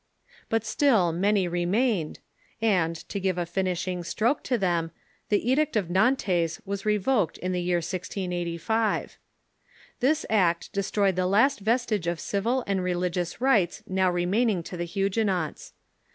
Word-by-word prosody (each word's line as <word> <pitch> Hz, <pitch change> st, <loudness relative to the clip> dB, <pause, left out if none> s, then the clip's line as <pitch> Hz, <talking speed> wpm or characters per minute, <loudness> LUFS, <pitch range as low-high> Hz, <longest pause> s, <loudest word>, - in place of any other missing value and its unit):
But 225 Hz, 0 st, 0 dB
still 215 Hz, -, +3 dB
many 195 Hz, +2 st, +1 dB
remained, 175 Hz, +1 st, 0 dB, 0.4 s
and, 180 Hz, -7 st, +2 dB
to 200 Hz, -, -4 dB
give 190 Hz, -2 st, -1 dB
a 175 Hz, -, -1 dB
finishing 180 Hz, 0 st, -2 dB
stroke 230 Hz, -, 0 dB
to 250 Hz, -, +1 dB
them, 175 Hz, -5 st, 0 dB, 0.4 s
the 210 Hz, +2 st, +1 dB
Edict 305 Hz, +1 st, +1 dB
of 190 Hz, -5 st, 0 dB
Nantes 185 Hz, -6 st, +1 dB
was 200 Hz, +2 st, -4 dB
re 210 Hz, 0 st, +3 dB
voked 205 Hz, -, 0 dB
in 185 Hz, -, -3 dB
the 180 Hz, -1 st, -1 dB
year 175 Hz, 0 st, +1 dB
1685. 180 Hz, +4 st, -2 dB, 0.8 s
This 295 Hz, +5 st, +2 dB
act 180 Hz, -6 st, +1 dB
destroyed 200 Hz, -1 st, +1 dB
the 185 Hz, 0 st, +1 dB
last 260 Hz, +9 st, +3 dB
vestige 220 Hz, -3 st, 0 dB
of 170 Hz, -1 st, -1 dB
civil 235 Hz, +6 st, -1 dB
and 195 Hz, -2 st, -1 dB
religious 180 Hz, 0 st, -2 dB
rights 225 Hz, -9 st, +2 dB
now 190 Hz, 0 st, +1 dB
remaining 180 Hz, +2 st, +1 dB
to 180 Hz, -, -7 dB
the 175 Hz, 0 st, -3 dB
Huguenots. 195 Hz, -3 st, -1 dB
190 Hz, 145 wpm, -26 LUFS, 175-220 Hz, 0.8 s, still